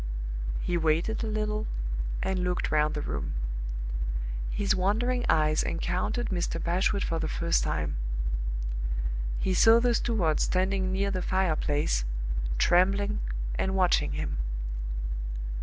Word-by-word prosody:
'" - - -4
He 175 - +2
waited 165 +8 +1
a - - -1
little 215 0 -1 0.6
and 190 -1 0
looked 180 0 0
round 150 0 +3
the 150 - -2
room. 70 0 -3 1.2
His 205 0 +1
wandering 225 +7 +1
eyes 155 0 +4
encountered 180 +8 -1
Mr. 175 -3 -1
Bashwood 185 +4 +1
for 165 - -1
the 160 - -1
first 170 +2 +1
time. - - -1 1.4
He 190 - +1
saw 225 +5 +7
the 245 0 +3
steward 200 -10 +1
standing 190 0 +1
near 200 +1 +1
the 185 -1 -1
fireplace, 155 - +1 0.5
trembling, 195 - +3 0.4
and 190 0 0
watching 185 -2 +3
him. - - -2
185 Hz, 125 wpm, -28 LUFS, 160-200 Hz, 1.4 s, saw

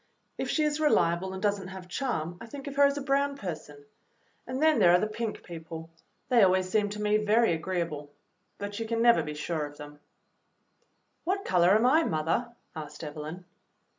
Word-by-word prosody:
If - - -3
she 310 - +1
is 300 0 0
reliable 185 - +2
and 190 0 -6
does 205 -1 +1
n't 190 - -8
have 190 -1 -9
charm, 175 - -3
I 230 - -8
think 275 +4 -9
of 280 -1 -6
her 285 0 +6
as 280 0 +2
a 285 - -3
brown 280 0 +1
person. 150 - -7 0.6
And 255 +1 -3
then 315 0 +4
there 175 - +6
are 180 - +6
the 215 - +1
pink 215 0 -4
people: 165 -1 -8 0.4
they 245 -3 +4
always 185 0 +4
seem 205 +2 +1
to 210 +1 -6
me 210 0 +3
very 215 -1 +3
agreeable, 160 -3 -3 0.5
but 205 +1 -5
you 225 - -3
can 230 0 0
never 235 0 +6
be 150 0 -5
sure 155 +1 -2
of 145 0 -14
them." 145 0 -11
EVELYN'S - - -39 1.2
WAR 370 +3 +2
WORK - - -5
45 180 -2 +3
"What - - +6
color 190 - +6
am 220 +3 +3
I, 310 +6 +5
mother?" 165 - -1 0.2
asked 150 0 -8
Evelyn. 155 +4 -7
190 Hz, 215 wpm, -28 LUFS, 165-240 Hz, 1.2 s, her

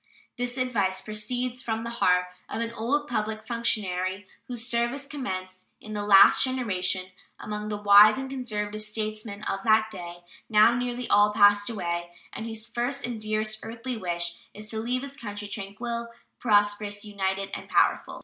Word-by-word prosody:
This 245 +1 -3
advice 205 -7 0
proceeds 245 +5 -2
from 225 -1 -2
the 235 - -4
heart 180 +1 +4 0.2
of - - -4
an 230 0 -3
old 280 +7 -1
public 215 -3 -2
functionary 200 -5 -1 0.2
whose 240 -2 -2
service 240 +3 0
commenced 185 -10 -6
in 215 - -9
the 210 - -2
last 200 -1 +7
generation, 190 -8 -1 0.3
among 210 0 -5
the 210 - -2
wise 205 +1 +7
and 265 0 -4
conservative 215 -5 -4
statesmen 215 -1 -4
of 195 - -2
that 220 0 +4
day, 175 -3 -8 0.3
now 215 +1 +6
nearly 245 0 -2
all 205 +1 +5
passed 205 0 +5
away, 175 -5 -3 0.2
and 225 - -5
whose 220 -1 -3
first 240 +4 -2
and 240 -3 -5
dearest 215 0 -1
earthly 235 +3 -5
wish 170 -3 -3 0.2
is 210 +1 -9
to 220 - -2
leave 250 +3 -1
his 280 0 -7
country 205 -4 -6
tranquil, 235 +4 -4 0.3
prosperous, 205 -1 +1
united, 195 -1 -2
and - - -6
powerful. - - +2
215 Hz, 160 wpm, -27 LUFS, 205-235 Hz, 0.3 s, last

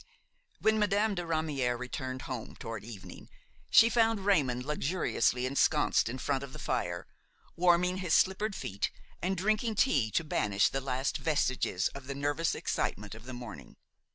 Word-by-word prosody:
When 220 0 +2
Madame 210 +1 +2
de 175 - -2
Ramière 155 -7 -1
returned 130 +1 -5
home, 125 -4 -6
toward 115 -3 -6
evening, 105 -4 -10 0.4
she 225 - +8
found 225 -2 +2
Raymon 140 -12 +3
luxuriously 150 -4 0
ensconced 140 -1 +2
in 125 - -4
front 135 +1 -1
of 135 -1 -9
the - - -8
fire, - - -2 0.5
warming 180 +1 +3
his 185 -3 +1
slippered 200 +2 +2
feet 100 +1 -2 0.3
and 190 +1 -1
drinking 215 +4 +1
tea 140 - +3
to 165 - +2
banish 100 -9 +2
the 135 - -2
last 130 0 -1
vestiges 130 - +1
of 135 -2 -10
the 140 - -4
nervous 145 +3 0
excitement 105 +2 -2
of 115 +1 -11
the 130 - -7
morning. 120 -3 -9
145 Hz, 155 wpm, -31 LUFS, 125-185 Hz, 0.5 s, she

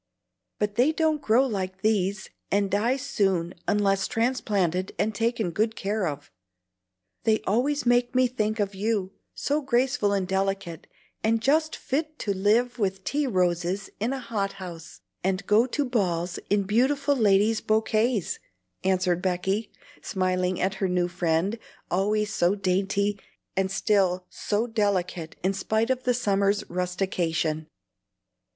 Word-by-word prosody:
But 210 0 -2
they 255 +6 +4
don't 315 -2 +1
grow 245 +2 +4
like 195 -5 -4
these, 200 -2 0 0.2
and 200 0 +1
die 230 +7 +2
soon 195 -10 0
unless 195 -2 +2
transplanted 200 -7 0
and 220 +1 0
taken 225 -3 0
good 220 +5 0
care 200 -1 -1
of. 145 -1 -6 0.9
They 220 -1 +3
always 255 +7 0
make 245 +1 +2
me 255 0 +5
think 215 -3 -1
of 200 -1 0
you, 200 -1 -1 0.2
so 290 +2 0
graceful 250 -5 +1
and 195 -2 0
delicate, 190 -3 -2 0.4
and 225 +1 +2
just 310 +6 +2
fit 305 +3 -3
to 200 - -1
live 230 +6 +2
with 190 -2 -1
tea 290 +5 0
roses 180 -1 0
in 225 +5 0
a 270 - -2
hot 215 -6 -2
house, 170 - -9 0.2
and 190 +1 0
go 220 +5 +4
to 285 +3 -1
balls 180 -8 -1
in 205 0 +3
beautiful 275 +8 +2
ladies' 215 -1 +3
bokays," 220 -1 +1 0.4
answered 185 -2 +1
Becky, 190 +4 -1 0.3
smiling 185 -2 0
at 190 +1 +1
her 190 - +2
new 180 -1 +1
friend, 175 +4 0 0.3
always 210 +3 +1
so 175 +3 +2
dainty, 195 +1 0 0.4
and 190 0 +1
still 190 -2 +1
so 210 +2 -1
delicate 195 -7 -1
in 190 +2 +2
spite 220 +5 0
of 255 -1 -2
the 250 -1 +3
summer's 200 -3 +1
rustication. 175 -3 -1
200 Hz, 140 wpm, -26 LUFS, 185-230 Hz, 0.9 s, me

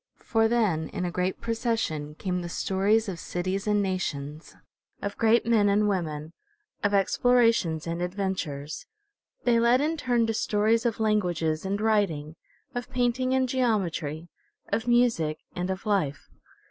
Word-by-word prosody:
For 225 -1 +2
then 210 -9 +1
in 180 - -3
a 175 - -2
great 180 +1 -1
procession 225 -11 -2
came 180 +1 -2
the 175 - -5
stories 200 +6 +1
of 180 -4 -5
cities 185 +3 -3
and 210 -1 +2
nations, 155 -5 -4 0.4
of 200 0 -4
great 225 +1 +3
men 220 -3 +3
and 210 +1 +3
women, 160 -5 -2 0.5
of 205 - +2
explorations 200 -5 +3
and 170 +1 -3
adventures. 180 -6 -3 0.6
They 235 -2 +3
led 235 +2 +4
in 310 +3 0
turn 245 -5 +1
to 225 - -1
stories 220 +2 +2
of 230 - -3
languages 180 -6 0
and 200 +1 -1
writing, 195 -9 0 0.4
of 245 +1 -4
painting 255 +1 +1
and 260 -1 +2
geometry, 175 - -1 0.4
of 220 +3 -1
music 230 -11 +2 0.2
and 180 +1 -2
of 190 0 -4
life. 185 -10 0
200 Hz, 145 wpm, -27 LUFS, 170-230 Hz, 0.6 s, led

